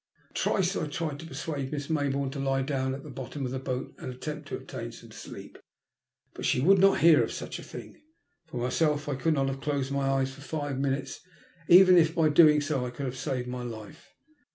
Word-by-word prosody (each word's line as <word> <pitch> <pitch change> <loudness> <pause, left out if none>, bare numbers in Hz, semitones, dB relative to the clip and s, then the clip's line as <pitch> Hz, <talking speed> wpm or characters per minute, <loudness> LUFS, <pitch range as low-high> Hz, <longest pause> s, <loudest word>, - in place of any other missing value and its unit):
Twice 190 0 +1
I - - -1
tried 150 -1 -4
to 160 - -8
persuade 145 -2 -4
Miss 145 -2 -3
Maybourne 140 -3 0
to 140 - -6
lie 135 -1 0
down 130 -1 -1
at 135 - -9
the 150 - -9
bottom 135 +2 -5
of 125 - -3
the 130 - -3
boat 130 -1 -4
and - - -5
attempt 150 +4 -6
to - - -4
obtain 130 -3 -7
some - - -13
sleep, - - -10 0.7
but - - -8
she - - +2
would 190 +8 +5
not 195 +1 +5
hear 165 -1 +7
of - - -3
such - - -6
a - - -9
thing. - - -10 0.5
For 145 - -7
myself 145 +4 0
I 145 - -1
could 155 +4 +1
not 135 -1 +1
have, 135 0 -4
closed 140 -2 -1
my 140 -1 0
eyes 135 -1 0
for 140 - -13
five 145 -2 -3
minutes, 135 -1 -2 0.5
even 180 0 +8
if 160 0 +2
by 160 -3 +4
doing 150 -1 +6
so 145 -3 -1
I 125 - -3
could 130 +3 -6
have 130 0 -4
saved 125 -1 -3
my 125 0 -4
life. 110 -4 -9
140 Hz, 225 wpm, -28 LUFS, 130-155 Hz, 0.7 s, even